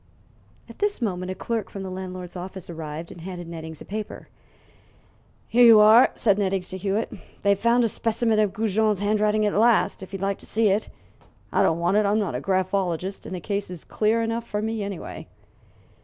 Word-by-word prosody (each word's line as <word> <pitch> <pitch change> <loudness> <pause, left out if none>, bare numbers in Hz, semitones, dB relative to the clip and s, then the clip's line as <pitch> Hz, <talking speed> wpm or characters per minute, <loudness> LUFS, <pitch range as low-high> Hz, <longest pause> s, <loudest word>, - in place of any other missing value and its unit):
At - - -14
this 415 0 0
moment 185 -6 -2
a 185 - -3
clerk 225 +1 -3
from 195 - -7
the 190 - -6
landlord's 185 -1 -7
office 185 0 -7
arrived 160 0 -7
and 170 - -11
handed 175 -1 -7
Nettings 160 -2 -8
a - - -9
paper. 210 +1 -6 1.2
"Here 245 +2 +4
you 230 -2 +9
are," 215 +4 +7
said 205 -2 +2
Nettings 190 -2 -1
to 185 - -5
Hewitt; 200 +3 -1 0.3
"they've 200 -1 +3
found 235 +2 +3
a - - +3
specimen 225 0 0
of 210 -2 +2
Goujon's 215 -1 +1
handwriting 210 +1 +2
at 205 - +1
last, 225 -1 +3
if 190 - -9
you'd 195 - -5
like 195 0 -1
to - - -11
see 220 -1 +2
it. 200 +3 0 0.6
I - - +2
don't 165 - +3
want 175 +4 +1
it; 210 -1 +3
I'm 205 +2 +2
not 205 -8 -1
a 125 - -3
graphologist, 185 0 -1
and 185 - -5
the - - -4
case 200 +2 -3
is 180 -3 -8
clear 225 +2 +1
enough 230 +1 -3
for 210 - -2
me 220 0 -2
anyway." 200 -3 -6
200 Hz, 200 wpm, -24 LUFS, 185-220 Hz, 1.2 s, you